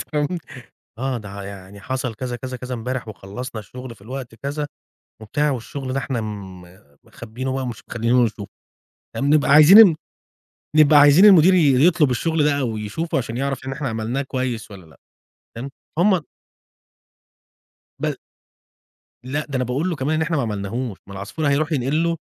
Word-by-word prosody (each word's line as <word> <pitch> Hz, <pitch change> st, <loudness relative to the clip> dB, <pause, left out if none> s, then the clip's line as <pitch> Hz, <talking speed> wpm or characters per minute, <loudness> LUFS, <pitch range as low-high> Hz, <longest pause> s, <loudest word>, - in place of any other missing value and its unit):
أنت -, -, -7 dB
فاهم، 150 Hz, -1 st, +1 dB, 0.7 s
آه، 130 Hz, -1 st, -2 dB
ده 100 Hz, -1 st, -8 dB
يعني 100 Hz, 0 st, -10 dB
حصل 130 Hz, -1 st, -3 dB
كذا، 125 Hz, +2 st, -5 dB
كذا، 130 Hz, 0 st, -6 dB
كذا، 125 Hz, 0 st, -6 dB
امبارح 125 Hz, 0 st, -4 dB
وخلّصنا 110 Hz, +4 st, -7 dB
الشُغل 125 Hz, +4 st, -10 dB
في 100 Hz, -, -21 dB
الوقت 125 Hz, 0 st, -7 dB
كذا. 145 Hz, +4 st, -4 dB, 0.6 s
وبتاع 145 Hz, +7 st, 0 dB
والشُغل 130 Hz, +2 st, -5 dB
ده 135 Hz, -, 0 dB
إحنا 125 Hz, -3 st, -3 dB
م 100 Hz, -4 st, -7 dB, 0.4 s
مخبّينه 125 Hz, +4 st, -6 dB
بقى 135 Hz, -, -2 dB
ومش 120 Hz, -4 st, -6 dB
مخلّيينُه 120 Hz, +2 st, +2 dB
يشوفه. 105 Hz, -2 st, -5 dB, 0.7 s
فبنبقى 145 Hz, +1 st, +2 dB
عايزين 170 Hz, +5 st, +9 dB, 0.8 s
نبقى 155 Hz, -1 st, +6 dB
عايزين 145 Hz, +7 st, +7 dB
المدير 185 Hz, -3 st, +7 dB
ي 145 Hz, -5 st, +4 dB
يطلب 155 Hz, -6 st, +3 dB
الشُغل 160 Hz, +5 st, 0 dB
ده 145 Hz, -1 st, +2 dB
أو 115 Hz, -5 st, -2 dB
يشوفه 110 Hz, +11 st, -3 dB
عشان 115 Hz, -2 st, -3 dB
يعرف 135 Hz, -1 st, -3 dB
إن 135 Hz, -, -4 dB
إحنا 135 Hz, -1 st, -3 dB
عملناه 115 Hz, +4 st, -2 dB
كويس 130 Hz, -5 st, -4 dB
والّا 95 Hz, -3 st, -11 dB
لأ، 80 Hz, -, -20 dB, 0.6 s
فاهم، 130 Hz, +4 st, -6 dB, 0.3 s
فهم 185 Hz, -1 st, +3 dB, 1.8 s
بال -, -, -2 dB, 1.1 s
لأ، 145 Hz, +4 st, -2 dB
ده 140 Hz, -, -3 dB
أنا 125 Hz, -, 0 dB
باقول 140 Hz, +9 st, -1 dB
له 165 Hz, -, -3 dB
كمان 140 Hz, +4 st, -1 dB
إن 160 Hz, -, +1 dB
إحنا 165 Hz, 0 st, -1 dB
ما 140 Hz, -, +1 dB
عملناهوش، 110 Hz, +1 st, -4 dB
ما 100 Hz, -, -11 dB
العصفور 100 Hz, +11 st, -4 dB
هيروح 150 Hz, +3 st, +1 dB
ينقل 145 Hz, +3 st, 0 dB
له 170 Hz, 0 st, 0 dB
130 Hz, 165 wpm, -21 LUFS, 115-145 Hz, 1.8 s, عايزين